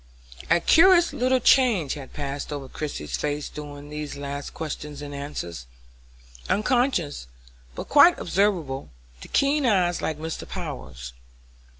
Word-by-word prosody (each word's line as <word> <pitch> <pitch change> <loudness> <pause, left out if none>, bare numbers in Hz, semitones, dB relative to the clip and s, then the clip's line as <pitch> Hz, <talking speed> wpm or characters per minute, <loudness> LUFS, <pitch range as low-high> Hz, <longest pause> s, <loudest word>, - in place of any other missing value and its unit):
A - - +5
curious 345 - +5
little 255 +1 +2
change 230 - +4
had 140 -4 -9
passed 145 0 -5
over 140 -2 -5
Christie's 75 - -5
face 145 - -3
during 145 -1 -9
these 150 -1 -6
last 140 0 -5
questions 150 -2 -6
and 145 -1 -7
answers, 85 - -6 0.8
unconscious, 215 - +1 0.5
but - - -6
quite 295 +5 +7
observable 170 -9 0 0.3
to - - -9
keen 285 +1 +2
eyes 185 -7 +2
like 155 - -2
Mr. 160 +1 -6
Power's. 70 - -7
150 Hz, 125 wpm, -25 LUFS, 140-210 Hz, 0.8 s, quite